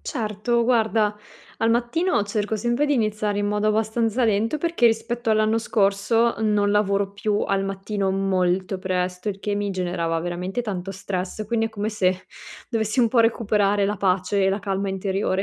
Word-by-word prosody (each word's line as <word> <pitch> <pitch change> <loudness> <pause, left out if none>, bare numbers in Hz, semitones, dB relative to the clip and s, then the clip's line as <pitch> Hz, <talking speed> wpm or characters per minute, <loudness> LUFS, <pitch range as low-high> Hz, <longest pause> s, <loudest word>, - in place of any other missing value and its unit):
Certo, 235 - -1
guarda, 220 -3 +2 0.4
al 225 - +2
mattino, 240 - +1
cerco 210 +1 -2
sempre 240 +6 0
di 290 - +2
iniziare 215 -3 0
in 205 - 0
modo 210 +1 0
abbastanza 225 +2 +1
lento, 225 +6 +1
perché 335 -6 +2
rispetto 235 +1 0
all'anno 215 +1 +3
scorso 220 +2 +1
non 210 -2 +2
lavoro 200 -1 +1
più 205 +1 -1
al 195 0 0
mattino 195 0 -2
molto 190 0 0
presto, 185 +1 -2
il 195 -1 -3
che 205 +1 -2
mi 205 0 -1
generava 175 -3 -1
veramente 175 +5 -3
tanto 195 -4 -4
stress. 195 +2 -4
Quindi, 225 0 0
è - - -4
come 210 -1 -3
se 185 -3 0 0.4
dovessi 220 0 -1
un 240 -2 +5
po' 235 +1 +3
recuperare 210 -3 +2
la 205 +1 -1
pace 190 +1 +1
e - - +3
la 195 +1 0
calma 195 -1 -2
interiore, 190 0 -1
205 Hz, 170 wpm, -23 LUFS, 195-225 Hz, 0.4 s, un